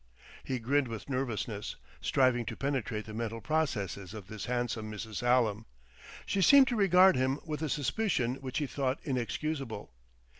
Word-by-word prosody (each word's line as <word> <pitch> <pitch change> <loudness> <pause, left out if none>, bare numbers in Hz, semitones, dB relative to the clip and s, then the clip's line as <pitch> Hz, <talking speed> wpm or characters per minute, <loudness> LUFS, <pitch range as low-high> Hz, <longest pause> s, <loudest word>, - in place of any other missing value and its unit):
] - - -18
He 130 - -2
grinned 130 +4 +1
with 115 -3 -7
nervousness, 120 -5 -2 0.3
striving 130 -3 +3
to - - -4
penetrate 125 -6 -2
the 110 - -8
mental 115 0 -3
processes 110 - -2
of 105 -4 -8
this 105 +1 -7
handsome 120 -3 -2
Mrs. 110 0 -5
Hallam. 120 -3 +2 0.6
She 195 - 0
seemed 275 +7 +8
to 245 - 0
regard 190 -2 +6
him 130 +2 +1
with 155 -2 -4
a 155 - -1
suspicion 145 - 0
which 135 -2 -5
he 150 - 0
thought 135 0 -1
inexcusable. 135 - -3
125 Hz, 160 wpm, -31 LUFS, 110-145 Hz, 0.6 s, seemed